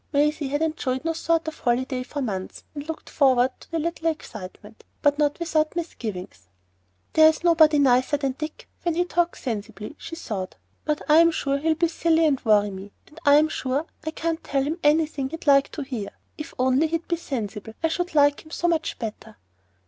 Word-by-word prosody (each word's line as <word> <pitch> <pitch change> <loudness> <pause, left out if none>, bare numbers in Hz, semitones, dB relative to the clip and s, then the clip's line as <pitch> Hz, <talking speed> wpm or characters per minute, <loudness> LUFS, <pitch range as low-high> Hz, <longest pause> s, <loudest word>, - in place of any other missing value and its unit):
Maisie 295 0 +1
had 290 +3 -1
enjoyed 295 -4 -2
no 330 - +1
sort 330 0 0
of 315 - -5
holiday 255 +1 0
for 275 +3 -4
months 190 -6 -5
and 290 0 -7
looked 320 - -6
forward 260 -3 +3
to - - -16
the 330 - -2
little 330 +1 -1
excitement, 210 - -8 0.2
but 290 0 +3
not 290 -1 +2
without 315 -2 0
misgivings. 200 - -6 0.7
"There's 315 +1 +5
nobody 320 -3 +5
nicer 260 +1 +3
than 275 -2 -1
Dick 305 +4 -7
when 340 -2 -1
he 355 +1 +2
talks 345 -1 -1
sensibly, 220 -2 -5
she 330 - -7
thought, 205 - -5 0.3
but 300 -1 -1
I'm 330 +2 +7
sure 280 -4 -1
he'll 315 +2 +1
be 340 +2 +2
silly 325 0 +2
and 280 -4 +1
worry 210 -2 +3
me, 195 +1 -9
and 305 - -16
I'm 295 +2 +7
sure 275 0 -2 0.2
I 315 - -2
can't 325 +1 -3
tell 275 -1 0
him 310 +5 -3
anything 295 -2 +2
he'd 325 +3 -8
like 275 -1 +5
to 295 - -4
hear. 245 -7 -5 0.3
If 300 - -7
he'd - - -19
only 270 +6 +2
be 340 +1 -3
sensible, 220 -9 -5
I - - +4
should 355 0 -3
like 290 0 +4
him 315 - -16
so 340 +2 -1
much 330 -2 0
better." 220 -1 -7
295 Hz, 195 wpm, -24 LUFS, 255-320 Hz, 0.7 s, I'm